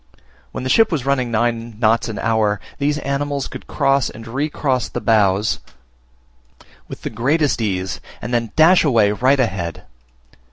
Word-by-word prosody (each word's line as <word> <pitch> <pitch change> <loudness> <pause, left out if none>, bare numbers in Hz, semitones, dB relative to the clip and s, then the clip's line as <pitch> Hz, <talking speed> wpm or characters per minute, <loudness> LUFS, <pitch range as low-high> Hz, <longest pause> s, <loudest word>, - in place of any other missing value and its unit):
When - - -6
the 130 - -2
ship 225 -3 +4
was 145 -6 -2
running 135 -3 0
nine 115 0 -1
knots 115 +1 +2
an 110 - -5
hour, 110 -3 +1 0.2
these 145 +1 +1
animals 140 -1 -2
could - - -10
cross 135 -1 +1
and 115 +1 -11
recross 135 0 -1
the - - -4
bows 105 -3 +2 1.3
with - - -10
the - - -4
greatest 140 +5 +1
of - - +1
ease, 95 -3 -3 0.2
and 120 - -6
then 115 -2 0
dash 170 +4 +6
away 115 -9 +3
right 130 +6 +2
ahead. 90 -9 -2
120 Hz, 160 wpm, -19 LUFS, 110-140 Hz, 1.3 s, dash